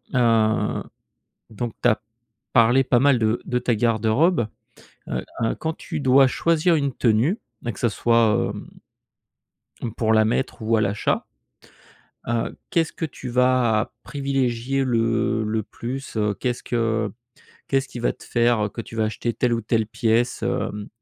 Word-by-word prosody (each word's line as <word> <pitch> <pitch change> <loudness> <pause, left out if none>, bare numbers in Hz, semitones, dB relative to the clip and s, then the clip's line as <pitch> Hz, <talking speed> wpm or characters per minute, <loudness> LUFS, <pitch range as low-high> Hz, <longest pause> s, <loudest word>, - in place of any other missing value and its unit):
heu, 115 -3 +2 0.7
donc 115 +1 -4
tu - - +4
as 115 - +2 0.5
parlé 125 +2 +5
pas 125 -1 +3
mal 140 -1 +4
de 110 +1 +1
de 125 - 0
ta 120 -1 0
garde-robe. 115 - +2 0.6
Heu, - - -3 0.2
hein, 115 - +1
quand 160 0 -3
tu - - -5
dois 135 0 +6
choisir 165 +5 +2
une 140 -2 0
tenue 120 - +2 0.3
et 120 - -1
que - - -13
ça 120 - +3
soit, 115 -1 +2
hem, - - -9 1.1
hem, 115 -3 -4
pour 110 -1 +1
la 110 0 +5
mettre 120 +1 -1
ou 110 +1 +2
à - - +2
l'achat, 105 0 0 1.0
heu, 115 -1 -1
qu'est-ce 165 -1 +1
que - - -4
tu 130 -3 -9
vas 125 -3 +2
privilégier 135 -2 -1
le 115 -1 +1
le 110 0 -1
plus, 130 +5 -7
heu? 105 -1 +1
Qu'est-ce 125 +2 -3
que 115 -3 0 0.6
qu'est-ce 135 0 +1
qui 120 - -7
va 120 - +1
te - - -16
faire, 120 -2 +2
heu, - - -4
que 115 - -6
tu 115 0 -9
vas 110 - +2
acheter 110 +2 -2
telle 120 +2 0
ou 115 - -1
telle 110 0 0
pièce, 115 +2 0
hem? 110 -4 -2
120 Hz, 165 wpm, -23 LUFS, 110-130 Hz, 1.1 s, dois